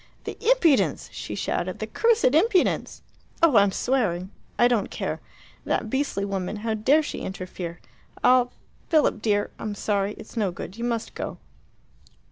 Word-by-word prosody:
"The -, -, -5 dB
impudence!" 445 Hz, -, +3 dB
she -, -, -5 dB
shouted. -, -, -2 dB
"The -, -, -3 dB
cursed 460 Hz, -, +2 dB
impudence! 370 Hz, +4 st, +2 dB, 0.4 s
Oh, 300 Hz, -8 st, +6 dB
I'm 200 Hz, -1 st, +5 dB
swearing. 190 Hz, -7 st, 0 dB, 0.3 s
I 240 Hz, -, +6 dB
don't 235 Hz, -5 st, +1 dB
care. -, -, -3 dB, 0.4 s
That 220 Hz, -, -1 dB
beastly 265 Hz, -7 st, 0 dB
woman 195 Hz, 0 st, -3 dB
how 225 Hz, -, +1 dB
dare 265 Hz, +9 st, +3 dB
she -, -, -5 dB
interfere 180 Hz, -2 st, -6 dB, 0.4 s
I'll 250 Hz, -1 st, +5 dB, 0.4 s
Philip, 310 Hz, -2 st, +3 dB
dear, 205 Hz, -2 st, +1 dB
I'm 210 Hz, -1 st, -4 dB
sorry. 205 Hz, 0 st, 0 dB
It's 215 Hz, -, -12 dB
no 210 Hz, -4 st, +1 dB
good. 180 Hz, +2 st, -8 dB
You 235 Hz, +1 st, -4 dB
must 235 Hz, -2 st, -2 dB
go." -, -, -5 dB
225 Hz, 150 wpm, -25 LUFS, 200-280 Hz, 0.4 s, Oh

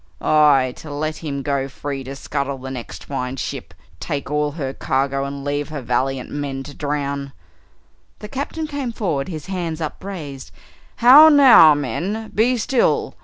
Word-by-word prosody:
"Aye 145 Hz, -4 st, +4 dB
to 155 Hz, -, -10 dB
let 155 Hz, +2 st, -3 dB
him 140 Hz, -4 st, -5 dB
go 140 Hz, -1 st, -1 dB
free 140 Hz, 0 st, -6 dB
to 135 Hz, +1 st, -7 dB
scuttle 140 Hz, 0 st, -3 dB
the 130 Hz, 0 st, -8 dB
next 125 Hz, -3 st, -8 dB
fine 130 Hz, -2 st, -4 dB
ship, 135 Hz, -, -5 dB, 0.3 s
take 140 Hz, 0 st, -4 dB
all 150 Hz, 0 st, 0 dB
her 135 Hz, -4 st, -4 dB
cargo, 135 Hz, +1 st, -1 dB
and 140 Hz, 0 st, -6 dB
leave 145 Hz, +1 st, -2 dB
her 155 Hz, -1 st, -5 dB
valiant 130 Hz, +2 st, -1 dB
men 140 Hz, -2 st, -4 dB
to 145 Hz, -, -10 dB
drown!" 140 Hz, -2 st, -3 dB, 0.8 s
The 210 Hz, -, -9 dB
Captain 280 Hz, +6 st, -4 dB
came 285 Hz, -5 st, -4 dB
forward, 160 Hz, -12 st, -2 dB
his 160 Hz, -5 st, -6 dB
hands 175 Hz, -4 st, -4 dB
upraised. 155 Hz, -, -6 dB, 0.5 s
"How 280 Hz, +6 st, +9 dB
now, 260 Hz, -, +8 dB
men, 175 Hz, -, -3 dB
be 245 Hz, +4 st, +2 dB
still! 240 Hz, +2 st, +1 dB
145 Hz, 160 wpm, -20 LUFS, 135-180 Hz, 0.8 s, How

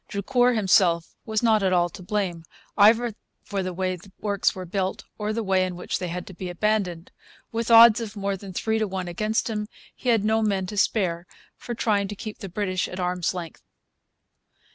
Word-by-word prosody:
Drucour 245 Hz, +5 st, +1 dB
himself 180 Hz, -5 st, +3 dB
was 220 Hz, +1 st, -1 dB
not 220 Hz, -2 st, +4 dB
at 190 Hz, -1 st, +2 dB
all 175 Hz, -1 st, +3 dB
to 185 Hz, -, -11 dB
blame, 185 Hz, -3 st, -2 dB, 0.3 s
either 225 Hz, +3 st, +5 dB, 0.3 s
for 200 Hz, -2 st, -3 dB
the 185 Hz, 0 st, -3 dB
way 185 Hz, +1 st, -2 dB
the 185 Hz, +2 st, -15 dB
works 200 Hz, -2 st, 0 dB
were 185 Hz, -1 st, -6 dB
built 190 Hz, +1 st, -2 dB, 0.2 s
or 210 Hz, 0 st, -1 dB
the 225 Hz, +1 st, -2 dB
way 190 Hz, -2 st, +2 dB
in 185 Hz, -1 st, -3 dB
which 180 Hz, -, -3 dB
they 180 Hz, -, -3 dB
had 175 Hz, +1 st, -5 dB
to 190 Hz, -, -10 dB
be 180 Hz, +1 st, -6 dB
abandoned. 180 Hz, -2 st, -1 dB, 0.4 s
With 230 Hz, 0 st, -2 dB
odds 230 Hz, 0 st, +8 dB
of 220 Hz, -2 st, -6 dB
more 200 Hz, -1 st, -2 dB
than 195 Hz, 0 st, -9 dB
three 220 Hz, +4 st, -1 dB
to 215 Hz, -, 0 dB
one 185 Hz, -2 st, -4 dB
against 215 Hz, +6 st, -1 dB
him, 210 Hz, -2 st, -3 dB, 0.3 s
he 250 Hz, -, -3 dB
had 225 Hz, -3 st, +3 dB
no 220 Hz, +1 st, +2 dB
men 200 Hz, -3 st, 0 dB
to 210 Hz, -, -7 dB
spare 180 Hz, -4 st, +1 dB, 0.3 s
for 240 Hz, -, -6 dB
trying 205 Hz, -3 st, +1 dB
to 205 Hz, -, -6 dB
keep 215 Hz, +1 st, -7 dB
the 195 Hz, -, -7 dB
British 185 Hz, 0 st, -1 dB
at 185 Hz, -, -7 dB
arm's 180 Hz, 0 st, -1 dB
length. 170 Hz, -3 st, -7 dB
200 Hz, 210 wpm, -25 LUFS, 185-215 Hz, 0.4 s, odds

